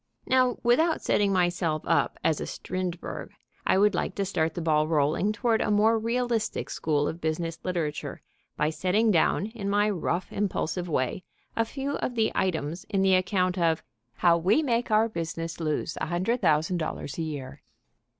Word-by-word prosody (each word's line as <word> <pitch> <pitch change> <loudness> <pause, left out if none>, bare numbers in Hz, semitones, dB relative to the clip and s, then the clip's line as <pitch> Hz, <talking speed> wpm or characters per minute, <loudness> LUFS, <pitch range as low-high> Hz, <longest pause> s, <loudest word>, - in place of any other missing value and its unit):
Now, 255 -1 +3
without 315 +8 +3
setting 200 -1 +2
myself 175 -4 +1
up - - +1
as 155 - +1
a - - -4
Strindberg, 180 -2 -5 0.4
I - - +4
would 205 +2 +4
like - - -2
to 200 - -1
start 160 -3 -1
the - - -3
ball 155 -1 +2
rolling 155 +6 +2
toward 220 +2 +1
a - - 0
more 215 +2 +4
realistic 235 -1 -1
school 145 -2 0
of 165 - -5
business 165 +1 -2
literature 165 -5 -3 0.3
by 150 +1 +1
setting 205 +7 +2
down 180 +2 +2
in 215 -2 -5
my 205 +1 +2
rough, 180 -1 -2
impulsive 180 -3 -2
way 145 +5 -1 0.3
a 230 - +2
few 275 +4 -3
of 245 - -3
the 220 -1 +2
items 170 -2 -1
in 195 -2 +1
the 190 -1 +4
account 185 0 +1
of 165 -1 +1 0.3
"How 170 -1 +3
We 205 - +3
Make 240 -3 0
Our 215 +1 +4
Business 165 -4 -4
Lose 155 -1 -2
$100,000 175 - 0
a - - 0
Year." 145 -5 -5
185 Hz, 165 wpm, -27 LUFS, 160-215 Hz, 0.4 s, I